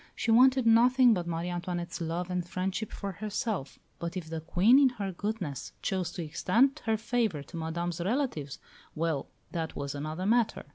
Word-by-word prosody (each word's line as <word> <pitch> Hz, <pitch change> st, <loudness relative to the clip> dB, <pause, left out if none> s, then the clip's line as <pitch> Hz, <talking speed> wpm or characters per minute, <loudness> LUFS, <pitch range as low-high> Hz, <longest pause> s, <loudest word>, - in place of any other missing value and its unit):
She 230 Hz, -, 0 dB
wanted 255 Hz, +2 st, +6 dB
nothing 245 Hz, +2 st, +6 dB
but 175 Hz, -4 st, -2 dB
Marie 170 Hz, +1 st, -2 dB
Antoinette's 175 Hz, 0 st, -4 dB
love 170 Hz, +2 st, -2 dB
and 180 Hz, -1 st, -1 dB
friendship 185 Hz, +4 st, -3 dB
for 200 Hz, -, -5 dB
herself; 205 Hz, -, -3 dB, 0.2 s
but 170 Hz, +2 st, -4 dB
if 160 Hz, -3 st, -6 dB
the 165 Hz, -1 st, -3 dB
Queen, 195 Hz, -, +5 dB
in 275 Hz, -2 st, +6 dB
her 200 Hz, -2 st, -2 dB
goodness, 185 Hz, -, -4 dB
chose 185 Hz, -3 st, -1 dB
to 175 Hz, -, -4 dB
extend 230 Hz, -, +2 dB
her 220 Hz, -1 st, +2 dB
favour 220 Hz, -, -1 dB
to 170 Hz, +5 st, -10 dB
Madame's 170 Hz, +1 st, -3 dB
relatives 190 Hz, -, -1 dB, 0.4 s
well, 160 Hz, -3 st, -1 dB, 0.2 s
that 165 Hz, -2 st, -3 dB
was 140 Hz, -1 st, -4 dB
another 155 Hz, +5 st, -4 dB
matter. 230 Hz, +1 st, +2 dB
180 Hz, 175 wpm, -29 LUFS, 165-225 Hz, 0.4 s, wanted